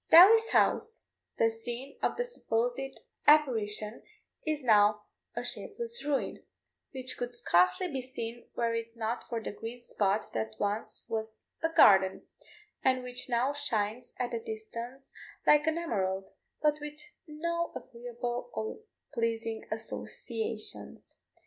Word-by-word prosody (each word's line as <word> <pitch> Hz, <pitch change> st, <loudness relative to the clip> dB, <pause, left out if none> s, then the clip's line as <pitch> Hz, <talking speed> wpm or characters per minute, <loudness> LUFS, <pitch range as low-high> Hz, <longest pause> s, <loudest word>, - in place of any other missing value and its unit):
Daly's 440 Hz, +7 st, +9 dB
house, 450 Hz, +2 st, +2 dB, 0.3 s
the 225 Hz, 0 st, +4 dB
scene 240 Hz, +4 st, -5 dB
of -, -, +1 dB
the 485 Hz, -, 0 dB
supposed 245 Hz, -, -1 dB, 0.3 s
apparition, 220 Hz, -7 st, +3 dB, 0.4 s
is 310 Hz, -2 st, -1 dB
now 210 Hz, -2 st, +5 dB, 0.3 s
a -, -, -2 dB
shapeless 470 Hz, 0 st, -3 dB
ruin, 285 Hz, -2 st, -1 dB, 0.5 s
which 260 Hz, -1 st, -3 dB
could 245 Hz, 0 st, -3 dB
scarcely 180 Hz, -, +3 dB
be 270 Hz, -6 st, -3 dB
seen 240 Hz, -2 st, -6 dB
were 230 Hz, -1 st, +1 dB
it 230 Hz, 0 st, -4 dB
not 230 Hz, +1 st, -3 dB
for 235 Hz, -, -1 dB
the -, -, -3 dB
green 225 Hz, +4 st, -7 dB
spot 205 Hz, -2 st, 0 dB
that 110 Hz, -1 st, -2 dB
once 205 Hz, +1 st, -2 dB
was 220 Hz, -1 st, -3 dB, 0.3 s
a 325 Hz, -, +2 dB
garden, 190 Hz, -11 st, +6 dB, 0.6 s
and 255 Hz, -1 st, +3 dB
which 250 Hz, +1 st, -3 dB
now 250 Hz, +3 st, +2 dB
shines 235 Hz, -5 st, -2 dB
at 245 Hz, -1 st, -2 dB
a 230 Hz, -, 0 dB
distance 230 Hz, +4 st, -7 dB, 0.3 s
like 300 Hz, +1 st, +6 dB
an 320 Hz, +1 st, +2 dB
emerald, 190 Hz, -, -1 dB, 0.3 s
but 300 Hz, 0 st, +3 dB
with 295 Hz, 0 st, -7 dB, 0.3 s
no 340 Hz, +3 st, -2 dB
agreeable 240 Hz, 0 st, -5 dB
or 220 Hz, -, -3 dB, 0.3 s
pleasing 225 Hz, -1 st, -1 dB
associations. 225 Hz, -, -5 dB
240 Hz, 130 wpm, -31 LUFS, 220-290 Hz, 0.6 s, Daly's